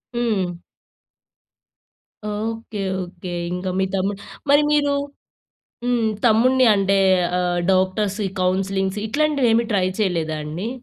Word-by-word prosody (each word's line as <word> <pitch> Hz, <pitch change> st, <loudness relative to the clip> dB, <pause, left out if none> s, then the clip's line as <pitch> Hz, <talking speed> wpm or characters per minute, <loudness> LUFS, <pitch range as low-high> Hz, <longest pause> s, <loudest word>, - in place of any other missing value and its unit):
హ్మ్. 195 Hz, -8 st, -1 dB, 1.7 s
Okay 220 Hz, 0 st, -4 dB, 0.2 s
okay. 180 Hz, 0 st, -8 dB, 0.2 s
ఇంకా 180 Hz, +1 st, -3 dB
మీ 190 Hz, -, +2 dB
తమ్ముడు 195 Hz, +1 st, -1 dB, 0.3 s
మరి 290 Hz, +1 st, +6 dB
మీరు 290 Hz, -1 st, +3 dB, 0.9 s
హ్మ్. 240 Hz, -2 st, +1 dB, 0.2 s
తమ్ముడిని 250 Hz, +3 st, +4 dB
అంటే 195 Hz, 0 st, +2 dB, 0.4 s
ఆహ్, 175 Hz, -1 st, 0 dB
డాక్టర్స్, 190 Hz, +2 st, 0 dB, 0.2 s
కౌన్సిలింగ్స్ 190 Hz, +1 st, 0 dB
ఇట్లాంటివేమీ 250 Hz, -4 st, +2 dB
ట్రై 185 Hz, -2 st, +2 dB
చేయలేదా 165 Hz, -6 st, 0 dB
అండి? 170 Hz, +9 st, -4 dB
200 Hz, 100 wpm, -21 LUFS, 185-230 Hz, 1.7 s, మరి